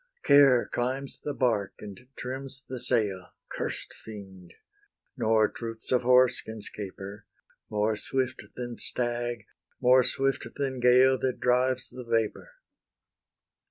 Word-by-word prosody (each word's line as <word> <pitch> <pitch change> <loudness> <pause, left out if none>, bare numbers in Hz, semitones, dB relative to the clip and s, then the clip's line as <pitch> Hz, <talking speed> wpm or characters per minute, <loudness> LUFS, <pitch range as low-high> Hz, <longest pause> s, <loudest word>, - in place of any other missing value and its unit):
Care 140 -4 +6
climbs 130 +3 -3
the 145 -1 -3
bark, 105 -6 0
and 105 +4 -11
trims 135 +1 -6
the 130 -1 -5
sail, 105 -7 0 0.2
Curst - - -4
fiend! 95 -5 -12 0.6
nor 110 -3 +3
troops 115 0 -8
of 125 - +3
horse 125 0 +4
can 110 0 -8
'scape 100 -2 -6
her, 100 +2 -9 0.4
More 105 +1 +1
swift 130 +3 -2
than 120 -1 -6
stag, 120 -1 -3 0.3
more 130 0 +6
swift 135 +1 0
than 135 -2 -2
gale 125 +1 +5
That 130 -1 -1
drives 125 +1 +1
the 125 - -8
vapour. 115 - -1
125 Hz, 125 wpm, -28 LUFS, 110-130 Hz, 0.6 s, Care